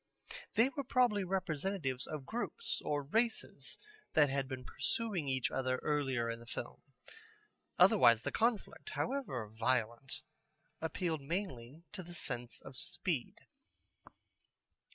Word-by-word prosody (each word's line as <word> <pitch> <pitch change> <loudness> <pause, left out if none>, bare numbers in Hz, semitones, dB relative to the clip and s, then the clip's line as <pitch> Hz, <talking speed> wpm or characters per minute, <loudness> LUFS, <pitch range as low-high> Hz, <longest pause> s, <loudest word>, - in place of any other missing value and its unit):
They 235 +4 +6
were 280 +1 -3
probably 245 -5 +3
representatives 180 -6 -1
of 150 -4 -5
groups 240 - -2
or 145 -1 0
races 225 - -1 0.4
that 150 -3 +5
had 135 -1 0
been 130 -1 -5
pursuing 200 - -1
each 130 -2 +1
other 130 -1 +1
earlier 135 -6 +1
in 115 0 -3
the 115 - -13
film. 120 - -5 1.0
Otherwise 120 - +7
the - - -1
conflict, 230 - 0
however 235 - -1
violent, 115 +3 0 0.6
appealed 160 0 -1
mainly 150 - -4
to 210 - -6
the 175 0 -10
sense 120 -7 -4
of 135 -1 -10
speed. 170 -5 -2
150 Hz, 120 wpm, -35 LUFS, 130-195 Hz, 1.0 s, Otherwise